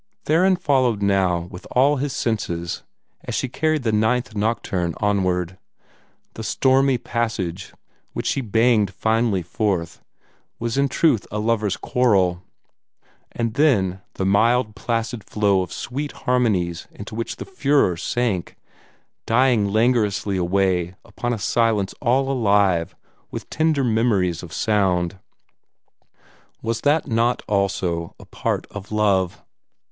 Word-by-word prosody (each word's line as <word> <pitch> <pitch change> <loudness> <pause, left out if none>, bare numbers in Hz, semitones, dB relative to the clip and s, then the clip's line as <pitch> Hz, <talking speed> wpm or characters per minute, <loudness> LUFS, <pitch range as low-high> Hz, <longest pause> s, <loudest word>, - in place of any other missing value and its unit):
Theron 185 +5 +4
followed 130 - +1
now 95 -3 +2
with 90 - -10
all 140 +3 +4
his 140 +1 -2
senses, 85 -9 -2 0.4
as - - -4
she - - -1
carried 155 +2 0
the 115 - +1
Ninth 110 +2 +1
Nocturne 100 -5 -1
onward. 95 -3 0 0.7
The - - -7
stormy 130 +3 +3
passage, 105 -7 -3 0.4
which - - -4
she 135 - 0
banged 110 -2 +2
finely 110 -4 +1
forth, 85 -2 -2 0.6
was 115 -1 -3
in 140 0 +2
truth 130 -11 +2
a 105 - -4
lover's 105 -2 0
quarrel; 95 -8 +2 0.9
and 115 -2 -2
then 100 -10 +2
the 95 - -2
mild, 110 +3 +2
placid 115 -1 -2
flow 100 -3 +1
of 90 -2 -5
sweet 145 +4 -4
harmonies 100 -10 +1
into 100 +1 -10
which 115 +1 -3
the - - -7
furore 145 - +2
sank, 105 0 -2 0.7
dying 115 -3 +3
languorously 105 -2 +1
away 90 -1 0
upon 120 - -4
a 120 - -1
silence 105 -2 +1
all 135 +1 +2
alive 100 - +2 0.3
with - - -7
tender 155 -3 +1
memories 110 -8 +1
of 90 - -10
sound 95 -4 0 1.4
was 115 0 -2
that 150 +2 +2
not 115 +2 +1
also 95 -5 -1
a - - -12
part - - -2
of 100 0 -9
love? 100 -4 +1
110 Hz, 125 wpm, -22 LUFS, 95-125 Hz, 1.4 s, Theron